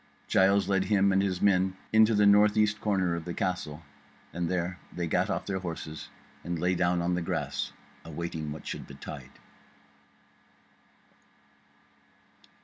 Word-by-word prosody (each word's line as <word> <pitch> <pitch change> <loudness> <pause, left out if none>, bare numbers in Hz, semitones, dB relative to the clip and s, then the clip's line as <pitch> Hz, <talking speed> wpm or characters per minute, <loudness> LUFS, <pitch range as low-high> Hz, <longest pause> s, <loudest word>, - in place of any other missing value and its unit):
Giles 95 0 +4
led 95 -1 +1
him 100 -1 +3
and 95 0 +3
his 95 -2 -1
men 95 -1 +3 0.2
into 110 0 +6
the 105 0 +4
north 105 +1 +5
east 105 -1 +2
corner 95 -4 +1
of 85 -1 -3
the 85 +1 -5
castle, 85 -4 -3 0.5
and 85 -1 -2
there 90 0 -2
they 85 - -3
gat 80 - +1
off - - -2
their 95 -1 -2
horses 80 -3 -6 0.3
and 85 0 -3
lay 90 +3 +1
down 90 -1 +1
on 90 +1 0
the 90 - 0
grass 85 - -2 0.3
awaiting 80 -1 -5
what 75 - -8
should - - -6
betide. - - -10
90 Hz, 145 wpm, -29 LUFS, 85-100 Hz, 0.5 s, into